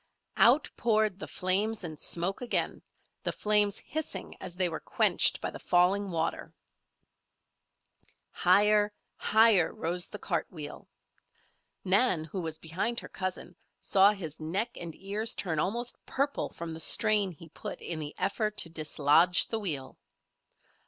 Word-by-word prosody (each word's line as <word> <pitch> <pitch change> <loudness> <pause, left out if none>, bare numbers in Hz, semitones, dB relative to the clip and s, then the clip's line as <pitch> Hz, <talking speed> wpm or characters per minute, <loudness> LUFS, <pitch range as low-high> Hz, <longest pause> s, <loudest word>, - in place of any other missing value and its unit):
Out 260 +6 +5
poured 215 -4 +1
the - - -6
flames 200 +4 0
and 155 -3 -6
smoke 175 +6 0
again, 245 - -1 0.4
the - - -1
flames 210 -1 +2
hissing 300 -11 -5
as 175 - -7
they 185 0 +3
were 160 -2 -4
quenched - - +2
by - - -4
the - - -9
falling 190 +3 +2
water. 165 -2 -3 1.8
Higher, 210 0 +3 0.2
higher 220 -6 +4
rose 175 +2 -1
the 210 - -6
cart 175 -5 -2
wheel. 150 -4 -9 1.0
Nan, 190 -3 +3
who 165 +4 -5
was 160 -2 -5
behind 190 +10 -2
her - - -10
cousin, 185 -1 -5 0.2
saw 195 +1 +5
his 165 -7 -7
neck 185 +9 -1
and 170 -2 -7
ears 210 +4 -2
turn 165 -5 -2
almost 235 +8 -2
purple 280 +1 -1
from 170 0 -7
the 160 - -8
strain 210 +3 +4
he 165 0 -14
put - - -7
in 165 -2 -3
the 150 -1 -6
effort 210 +3 -1
to 165 - +2
dislodge 160 +2 +3
the 225 - -2
wheel. 145 -10 -3
185 Hz, 145 wpm, -29 LUFS, 165-210 Hz, 1.8 s, Out